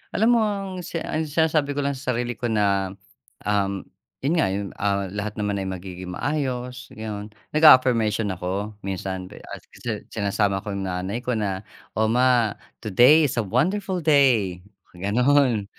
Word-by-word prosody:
Alam 220 +3 +3
mo - - +4
ang 200 -2 -2 0.2
si 170 - -4
ang 160 0 -2
sinasabi 155 -1 +1
ko 145 - 0
lang 140 0 -1
sa 130 0 -2
sarili 120 +1 -2
ko 120 +2 -3
na, 100 -3 +1 0.5
um, 100 -2 0 0.4
yun 140 +5 +1
nga 160 - +3
yun, 100 0 -3
ah, 100 -1 0
"Lahat 105 +2 -4
naman 105 -1 -1
ay 95 - -3
magiging 90 -1 -6
maayos." 125 -1 -3
Yon, 105 -1 -6 0.2
nag-a-affirmation 120 -8 +5
ako. 95 +3 -4
Minsan, 95 -1 -4
b - - -11
ah, - - -8 0.2
kasi 110 -4 -5
sinasama 100 -2 0
ko 105 - -5
yung 100 -1 -3
nanay 95 +4 -3
ko 125 - 0
na, 100 -3 -2 0.3
"O 110 - +3
ma, 120 -3 +3 0.3
today 125 - +6
is 140 - -2
a - - +1
wonderful 185 - 0
day!" 125 - +3 0.3
Gano'n. 120 +4 +2
110 Hz, 165 wpm, -24 LUFS, 100-135 Hz, 0.5 s, today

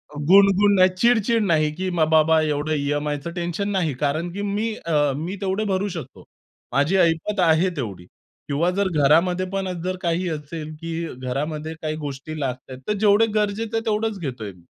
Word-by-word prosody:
अ, - - -7
गुण-गुण 200 +2 +6
नाही, 185 -1 +6
चिड-चिड 230 +1 +3
नाही 155 -4 +2
की 185 +2 -2
मग 155 -1 +3
बाबा 160 0 +4
एवढं 150 0 -1
ई-एम-आयचं 145 +2 -2
टेन्शन 175 +3 -3
नाही 180 -7 0
कारण 150 +6 -1
की 200 - -4
मी 205 +2 -1
अ, 170 - -6 0.2
मी 165 +7 -4
तेवढे 195 +2 -1
भरू 190 +2 0
शकतो. 165 - -8 0.5
माझी 145 +7 +2
ऐपत 170 +4 +1
आहे 170 +1 +4
तेवढी 100 - -5 0.4
किंवा 150 +5 +1
जर 200 -1 +2 0.2
घरामध्ये 175 +6 +3
पण 195 0 -2 0.2
जर 185 0 -2
काही 175 +1 0
असेल 155 0 -6
की 165 0 -5 0.2
घरामध्ये 150 +5 -4
काही 155 -1 -2
गोष्टी 145 +3 -6
लागतायेत, 130 -1 -5
तर - - +1
जेवढे 210 +1 +4
गरजेचं 215 +2 0
आहे - - 0
तेवढेच 220 -1 0
घेतोय 125 - -5
मी. 90 -2 -20
170 Hz, 175 wpm, -23 LUFS, 150-195 Hz, 0.5 s, गुण-गुण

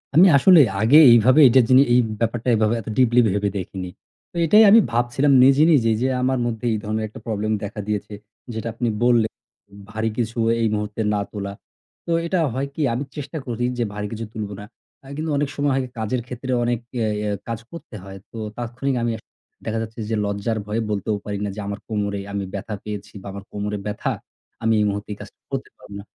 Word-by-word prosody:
আমি 180 +5 +8
আসলে 175 +4 +7 0.2
আগে 125 +8 +6
এইভাবে 120 +5 +6
এটার 125 +1 +5
জিনি 130 +1 +7
এই 125 - +6 0.2
ব্যাপারটা 115 +1 -2
এইভাবে 110 0 +2
এত - - -19
deeply 125 -1 +4
ভেবে 100 +1 0
দেখিনি। 95 0 -5 0.4
তো - - -25
এটাই 210 +7 +7
আমি 225 - +8
ভাবছিলাম 120 +4 +1
নিজে, 135 +2 +5
নিজেই 115 -6 +3
যে 130 - +2
আমার 130 0 +1
মধ্যে 115 0 -3
এই - - 0
ধরনের 110 +1 -2
একটা 110 - -11
problem 110 -1 -2
দেখা 105 +1 -6
দিয়েছে 105 0 -3 0.4
যেটা 110 0 -4
আপনি 120 0 -2 0.2
বললেন, 120 -3 +3 0.6
ভারী 110 +1 -2
কিছু 115 -1 -2 0.2
এই 115 - +2
মুহূর্তে 105 +1 -3
না 105 - 0
তোলা। 100 -1 -5 0.5
তো 170 - -3
এটা 180 +2 0
হয় 135 +3 -2
কি 155 - -3
আমি 125 - -2
চেষ্টা 150 +2 -6
করি 120 0 -2
যে 120 - +1
ভারী 105 0 -4
কিছু 115 0 -5
তুলবো 105 -2 -5
না। 105 - -8 0.4
অ্যা 135 - -15
কিন্তু 160 +1 -3
অনেক 145 -1 0
সময় 145 -1 0
হয় 135 - 0 0.2
কাজের 120 +3 -1
ক্ষেত্রে 130 +1 -5
অনেক 120 -1 0 0.2
ইয়া 110 -2 0
ইয়া 105 -1 -1 0.2
কাজ 115 -1 -3
করতে 170 -9 -10
হয়। 95 0 -9
তো 115 - -10 0.2
তাৎক্ষণিক 125 +3 -3
আমি 120 - 0
এক 110 - -15 0.4
দেখা 115 0 -2
যাচ্ছে 115 +1 -7
যে 110 - 0
লজ্জার 100 +2 -2
ভয়ে 110 +2 -2
বলতেও 105 +1 -1
পারি 105 -1 -3
না - - -2
যে - - -7
আমার 100 +1 -4
কোমরে 100 -2 -2
আমি 100 -1 -2
ব্যথা 100 +2 -5
পেয়েছি 105 -2 -7
বা - - -10
আমার 100 0 -8
কোমরে 105 0 -3
ব্যথা, 105 0 -2 0.5
আমি 115 0 +3
এই - - +2
মুহূর্তে 100 +1 -5
এই - - -11
কাজটা - - -13
করতে - - -4
পারব - - -16
না। - - -9
115 Hz, 210 wpm, -22 LUFS, 105-125 Hz, 0.6 s, আমি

